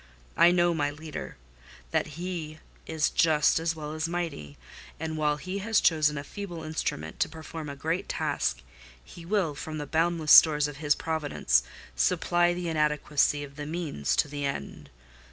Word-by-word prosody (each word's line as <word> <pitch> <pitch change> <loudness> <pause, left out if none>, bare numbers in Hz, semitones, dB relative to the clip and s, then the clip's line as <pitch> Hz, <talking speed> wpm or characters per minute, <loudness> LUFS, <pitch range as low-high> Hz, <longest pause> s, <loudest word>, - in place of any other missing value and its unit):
I - - +7
know 175 -1 +3
my 145 -3 0
Leader: 155 +1 -8 0.5
that 155 0 -1
He 170 -3 -5 0.3
is 160 -2 0
just 155 -2 +3
as 165 0 -1
well 150 -1 -6
as 155 +1 -2
mighty; 160 - -4 0.4
and 160 0 -3
while 150 -1 +1
He 185 +5 -5
has 220 +2 +2
chosen 150 -2 +3
a 140 - -4
feeble 175 0 -7
instrument 155 - -4
to - - +1
perform 160 -1 -8
a 140 - -6
great 165 +6 -2
task, - - -1 0.4
He 165 - -12
will, 190 -6 +1
from 155 +2 -6
the 150 - -4
boundless 160 +1 +1
stores 150 -2 +8
of 145 -2 -8
His 145 0 +2
providence, 155 - +1 0.3
supply 175 - +2
the 175 -1 -4
inadequacy 150 -2 +1
of 140 0 -11
the 145 -1 -5
means 155 - -2
to - - +2
the 145 0 -5
end. 140 - -5
155 Hz, 170 wpm, -28 LUFS, 145-170 Hz, 0.5 s, stores